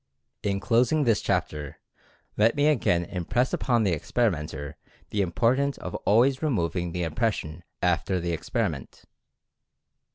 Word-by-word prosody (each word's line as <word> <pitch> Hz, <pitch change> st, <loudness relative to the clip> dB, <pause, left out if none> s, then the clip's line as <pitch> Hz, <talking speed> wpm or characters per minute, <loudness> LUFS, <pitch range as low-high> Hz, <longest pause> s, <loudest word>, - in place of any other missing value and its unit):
In 100 Hz, -1 st, -1 dB
closing 125 Hz, +8 st, +2 dB
this 115 Hz, -5 st, +2 dB
chapter, 75 Hz, -2 st, -2 dB, 0.6 s
let 110 Hz, +2 st, +3 dB
me 145 Hz, -, +2 dB
again 105 Hz, -, +2 dB
impress 105 Hz, +9 st, -1 dB
upon 120 Hz, -3 st, +1 dB
the 100 Hz, -, +2 dB
experimenter 75 Hz, -, -2 dB, 0.4 s
the 105 Hz, -, +1 dB
importance 125 Hz, +10 st, +1 dB
of 90 Hz, -, -7 dB
always 130 Hz, +5 st, +4 dB
removing 90 Hz, -, -1 dB
the 90 Hz, +1 st, -2 dB
impression 85 Hz, -3 st, -2 dB, 0.2 s
after 90 Hz, +1 st, +1 dB
the 85 Hz, 0 st, -2 dB
experiment. 85 Hz, -, -3 dB
100 Hz, 125 wpm, -26 LUFS, 85-120 Hz, 0.6 s, always